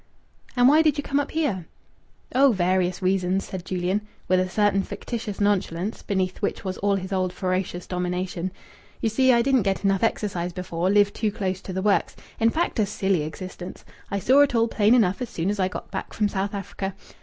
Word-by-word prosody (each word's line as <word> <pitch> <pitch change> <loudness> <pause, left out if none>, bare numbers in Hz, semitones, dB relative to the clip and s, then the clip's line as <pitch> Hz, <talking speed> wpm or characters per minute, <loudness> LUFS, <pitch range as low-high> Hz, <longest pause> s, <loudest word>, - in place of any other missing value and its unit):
"And 245 0 +5
why 300 +4 +6
did 310 -2 +2
you 290 - -2
come 280 0 0
up 285 - -2
here?" 245 - -1 0.7
"Oh, 270 0 +5
various 185 0 +1
reasons!" 185 0 +1
said 185 -2 -6
Julian, 185 +2 -1 0.3
with 185 0 +3
a 185 0 0
certain 205 0 +2
fictitious 220 0 -5
nonchalance, 200 -1 0
beneath 190 -1 -2
which 200 - -2
was 185 -1 -3
all 200 0 +2
his 190 0 -4
old 185 -1 0
ferocious 185 -1 -2
domination. 180 0 -2 0.5
"You 225 - +1
see, 260 +4 +4
I 235 -1 +4
didn't 265 -1 +3
get 195 0 -1
enough 195 -1 +2
exercise 185 -6 -1
before. 180 0 -2
Lived 205 0 +4
too 215 -2 -1
close 190 -2 -3
to - - -7
the 190 +1 -2
works. 205 -1 +2 0.2
In 225 0 +4
fact, 320 -1 -1
a 210 - +3
silly 195 -4 0
existence. 180 +4 -7 0.2
I 200 - -1
saw 260 +8 +4
it 285 -4 +3
all 230 0 +3
plain 220 +1 +4
enough 205 -3 +2
as 245 - -3
soon 175 +4 -1
as 210 - -4
I 185 - +3
got 185 - -7
back - - -5
from 210 - +1
South 200 +1 -2
Africa.... 195 0 -5
195 Hz, 205 wpm, -24 LUFS, 185-220 Hz, 0.7 s, why